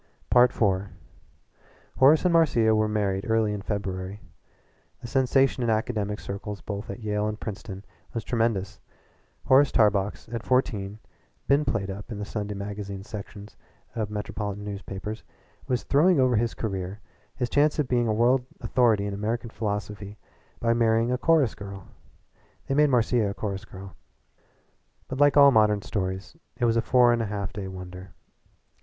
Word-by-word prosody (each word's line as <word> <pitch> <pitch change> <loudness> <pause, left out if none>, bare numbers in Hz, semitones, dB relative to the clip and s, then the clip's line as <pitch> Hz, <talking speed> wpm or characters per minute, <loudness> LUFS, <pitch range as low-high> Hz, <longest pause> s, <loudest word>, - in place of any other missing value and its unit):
IV 125 0 +5 1.4
Horace 145 +4 +6
and 180 - +3
Marcia 120 -10 +4
were 110 0 +2
married 100 -2 -1
early 110 -2 +2
in 105 - -4
February. 95 -1 -4 0.8
The - - -10
sensation 135 +1 +2
in 120 - 0
academic 110 -2 -1
circles 100 +1 -6
both 100 +1 -6
at - - -6
Yale 105 -1 -1
and 105 0 -4
Princeton 100 -2 -7 0.3
was 115 - -4
tremendous. 115 -5 -1 0.7
Horace 135 +1 +5
Tarbox, 105 -2 +2
who - - -18
at 115 -2 -3
fourteen 110 -7 0 0.4
had - - -41
been 140 +2 +3
played 100 -1 -1
up 100 +5 -8
in 110 - -4
the 105 - -4
Sunday 105 -1 -4
magazines 100 -1 -6
sections 105 0 -9 0.4
of 110 -3 -2
metropolitan 105 -1 -4
newspapers, 105 +1 -6 0.5
was 125 -1 0
throwing 165 +4 +4
over 130 -2 +3
his 115 +1 0
career, 95 -2 -4 0.4
his 125 - -1
chance 145 +4 +2
of 150 -4 0
being 120 -2 +1
a - - +1
world 125 +4 +3 0.2
authority 115 -5 +2
on 100 - -4
American 110 +3 -3
philosophy, 105 -1 -4 0.4
by 115 0 +2
marrying 115 0 +2
a 125 - +1
chorus 155 -5 +3
girl 100 -2 -9 0.8
they - - -2
made 150 +1 +4
Marcia 120 -3 +2
a 100 - -5
chorus 100 0 -4
girl. 95 -1 -11 1.1
But 130 - -5
like 145 0 +5
all 140 -1 +8
modern 105 -3 +3
stories 95 +5 -4 0.2
it 120 - +1
was 115 -1 +2
a 115 - +3
four 125 0 +4
and 120 - 0
a 115 - -2
half 100 -1 -4
day 100 -2 -5
wonder. 90 -1 -9
110 Hz, 160 wpm, -26 LUFS, 100-120 Hz, 1.4 s, all